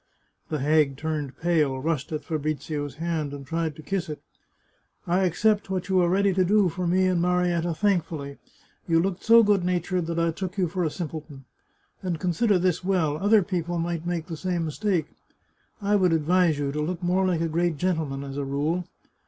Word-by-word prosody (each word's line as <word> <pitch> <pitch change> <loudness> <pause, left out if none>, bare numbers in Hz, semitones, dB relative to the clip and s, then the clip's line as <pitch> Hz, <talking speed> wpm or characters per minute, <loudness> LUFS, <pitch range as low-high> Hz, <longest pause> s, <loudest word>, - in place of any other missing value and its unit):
The 155 - -1
hag 150 -2 +3
turned 150 -3 -3
pale, 155 -6 +1
rushed 155 0 -2
at 155 - -3
Fabrizio's 150 -2 -3
hand, 160 -2 -2
and 140 -1 -9
tried 160 +1 -2
to 155 - -11
kiss 190 -3 -2
it 150 - -5 0.5
" - - -41 0.3
I 180 +2 +2
accept 205 +4 +1
what 190 0 -3
you 190 -1 +3
are 175 -1 +3
ready 195 +1 +3
to 185 0 +3
do 200 0 +3
for. 180 +2 -3
me 185 +2 +3
and 180 -2 +2
Marietta 175 -1 +1
thankfully; 160 -7 -1 0.5
you 165 -1 +3
looked 185 +1 -1
so 230 0 +7
good 205 -3 +3
natured 180 -1 -1
that 170 0 -3
I 165 0 +2
took 185 +3 -5
you 185 -2 +2
for 180 +2 -2
a 160 - +1
simpleton. 150 -4 -7 0.6
And 175 -4 -2
consider 185 +4 +2
this 180 -1 0
well; 175 -6 +1
other 205 +1 +4
people 175 -2 -2
might 170 0 -2
make 170 -2 -2
the 165 - -6
same 175 0 -1
mistake. 175 +1 0 0.8
I 205 +1 +2
would 180 -4 +3
advise 165 0 +3
you 140 -1 -1
to 150 +2 -2
look 175 +3 -3
more 180 +2 +2
like 175 -3 0
a 165 - +1
great 170 0 0
gentleman, 155 -6 -1
as 135 0 -7
a 145 - -1
rule." 150 +6 -1
170 Hz, 200 wpm, -25 LUFS, 155-185 Hz, 0.8 s, so